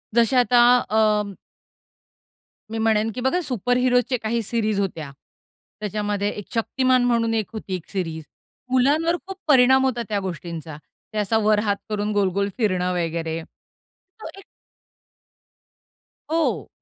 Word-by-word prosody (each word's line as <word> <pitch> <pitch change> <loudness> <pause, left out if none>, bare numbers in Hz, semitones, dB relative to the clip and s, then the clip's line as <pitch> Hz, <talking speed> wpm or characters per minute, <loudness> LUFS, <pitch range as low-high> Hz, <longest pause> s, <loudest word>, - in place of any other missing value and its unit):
जसे 235 +2 +3
आता, 245 0 +4 0.3
अ 210 -2 +2 1.4
मी 225 - -3
म्हणेन, 220 0 +2
की 250 - -6
बघा, 265 +8 +1
सुपर 245 - -1
हीरोजचे 250 0 +2
काही 230 +1 -1
सीरीज 215 -2 -1
होत्या. 165 -7 -3 0.7
त्याच्यामध्ये 205 0 -2
एक 205 - -6
शक्तिमान 255 +2 +2
म्हणून 230 -2 +1
एक 220 -3 -1
होती, 205 -4 -4
एक 180 - -8
सीरीज 165 -5 -4 0.5
मुलांवर 295 +7 +3
खूप 385 -1 -7
परिणाम 265 -2 +5
होता 245 -2 0
त्या 205 -1 0
गोष्टींचा. 170 -4 -6 0.4
ते 215 - -4
असा 210 +2 +1
वर 215 -1 +4
हात 205 -1 +1
करून, 210 0 -1
गोल-गोल 200 0 +1
फिरणं 185 -6 0
वगैरे 165 -1 -2 0.8
तो - - -6
एक 390 - -12 1.9
हो. 325 0 0
215 Hz, 130 wpm, -23 LUFS, 195-245 Hz, 1.9 s, परिणाम